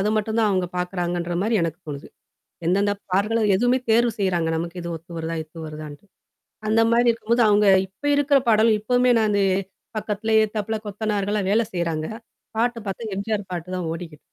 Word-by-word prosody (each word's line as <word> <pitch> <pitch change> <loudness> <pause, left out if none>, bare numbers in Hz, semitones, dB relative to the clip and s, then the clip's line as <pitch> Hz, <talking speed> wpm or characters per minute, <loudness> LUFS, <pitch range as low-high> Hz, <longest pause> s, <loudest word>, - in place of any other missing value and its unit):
அதை 210 +2 +1
மட்டும் 220 +1 -1
தான் 215 - +3
அவுங்க 185 -2 +1
பாக்குறாங்கன்ற 175 -1 -2
மாரி, 225 +2 0
எனக்கு 165 +1 -2
தோணுது. 145 -2 -7 0.6
எந்தெந்த 200 +3 +2 0.2
பாடல்கள 210 +4 +2 0.2
எதுவுமே 245 +5 +3
தேர்வு 235 +1 +4
செய்கிறாங்க 180 -5 +1
நமக்கு 170 +2 -4
இது 170 - -5
ஒத்து 165 +2 -13
வருதா, 165 0 -3
இது 160 +1 -10
வருதாண்ட்டு. 155 +2 -9 0.6
அந்த 220 +1 +4
மாதிரி 240 +1 +4
இருக்கும்போது 230 +1 +1
அவுங்க 210 0 +4 0.2
இப்போ 285 +10 -7
இருக்கிற 285 -1 +4
பாடலும் 220 0 +4
எப்பவுமே 250 +3 +3
நானு, 210 -2 +2 0.6
பக்கத்துலேயே 220 +1 +1
எதுத்தாப்புல 215 0 -3
கொத்தனார்கள்லாம் 205 -1 -1
வேலை 225 +1 +3
செய்றாங்க. 165 -3 -1 0.5
பாட்டு 240 0 +1
பாத்தா, 210 +2 -4
எம்ஜிஆர் 205 -1 -3
பாட்டு 175 0 -5
தான் 170 -3 -3
ஓடிக்கிட் 165 -3 -8
205 Hz, 165 wpm, -23 LUFS, 175-225 Hz, 0.6 s, தேர்வு